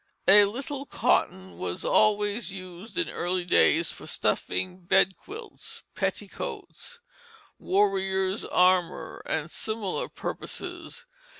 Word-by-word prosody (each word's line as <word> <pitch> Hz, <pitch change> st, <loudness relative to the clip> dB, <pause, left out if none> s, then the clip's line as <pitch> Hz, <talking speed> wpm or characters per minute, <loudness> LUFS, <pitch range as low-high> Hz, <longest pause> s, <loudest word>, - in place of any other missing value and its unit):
A 205 Hz, +1 st, +9 dB
little 270 Hz, +6 st, -4 dB
cotton 190 Hz, +1 st, 0 dB
was 90 Hz, -1 st, -3 dB
always 210 Hz, -1 st, +3 dB
used 185 Hz, -, -9 dB
in 335 Hz, -, +1 dB
early 180 Hz, 0 st, -2 dB
days 330 Hz, -, +4 dB
for -, -, -9 dB
stuffing 185 Hz, 0 st, -1 dB
bedquilts, 195 Hz, -, 0 dB
petticoats, 485 Hz, 0 st, -4 dB, 0.6 s
warriors' 190 Hz, 0 st, +1 dB
armor, 180 Hz, -3 st, +2 dB
and 160 Hz, +1 st, -1 dB
similar 215 Hz, -4 st, -2 dB
purposes. -, -, -6 dB
190 Hz, 95 wpm, -27 LUFS, 185-215 Hz, 0.6 s, A